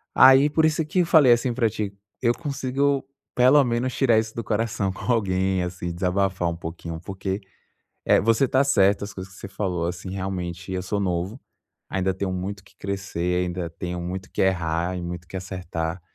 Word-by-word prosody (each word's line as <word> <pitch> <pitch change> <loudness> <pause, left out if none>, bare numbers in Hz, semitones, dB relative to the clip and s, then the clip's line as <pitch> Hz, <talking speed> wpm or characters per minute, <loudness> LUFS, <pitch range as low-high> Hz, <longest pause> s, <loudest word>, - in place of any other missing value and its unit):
Aí, 135 +3 +8
por 160 +2 +3
isso 155 0 +2
que 180 +4 0
eu 175 - +4
falei 155 -6 +6
assim 120 +1 0
pra 115 -2 +2
ti, 105 -2 -4 0.3
eu 120 -1 +3
consigo 140 -2 -1 0.3
pelo 130 +4 +6
menos 120 +1 -1
tirar 120 -5 +4
isso 110 0 -4
do 115 - -3
coração 105 -3 -1
com 125 - -2
alguém, 95 -4 +1
assim 90 -1 -4
desabafar 90 0 0
um 85 - -3
pouquinho, 85 -1 -7
porque, 95 +1 -4 0.6
eh, - - +5
você 115 +5 +3
está 130 +2 +3
certo 100 -7 +3
as 100 - -9
coisas 95 0 -8
que - - -14
você 100 - -7
falou, 90 -4 -2
assim 90 +1 -5
realmente 90 -2 -4
eu 90 - -1
sou 100 +1 -1
novo, 95 +5 -2 0.5
ainda 95 0 0
tenho 95 0 -3
muito 95 +2 -4
o - - -21
que - - -22
crescer, 90 -2 -2
ainda 90 -1 -3
tenho 90 +1 -5
muito 95 +2 -4
o - - -30
que - - -1
errar 90 -1 0
e - - -4
muito 85 0 -5
o - - -33
que 95 - -6
acertar. 90 -2 -4
95 Hz, 205 wpm, -24 LUFS, 90-115 Hz, 0.6 s, Aí